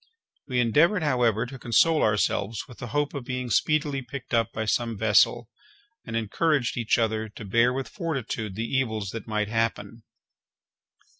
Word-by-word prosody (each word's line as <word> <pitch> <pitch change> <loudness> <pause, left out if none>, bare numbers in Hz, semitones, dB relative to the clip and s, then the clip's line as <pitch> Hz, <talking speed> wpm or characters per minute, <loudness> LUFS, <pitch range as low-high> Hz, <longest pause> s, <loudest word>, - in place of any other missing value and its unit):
We 125 -2 0
endeavoured, 160 - +3
however, 120 -6 +2
to 135 +1 -9
console 155 +7 +3
ourselves 105 0 0
with 120 -5 -14
the 120 - -6
hope 145 +5 -1
of 140 -3 -5
being 125 -1 -4
speedily 150 -1 +1
picked 130 0 -9
up 115 -2 +2
by 110 - -3
some 115 0 0
vessel 110 +2 +3 0.6
and 115 - -4
encouraged 125 +5 0
each 115 -2 +1
other 110 -1 0
to 105 +1 -10
bear 115 +5 +3
with 135 +1 -3
fortitude 130 - -4
the 110 +2 -2
evils 110 -6 -1
that 115 - -7
might 105 -1 -1
happen. 115 -1 -2
115 Hz, 160 wpm, -26 LUFS, 110-135 Hz, 0.6 s, endeavoured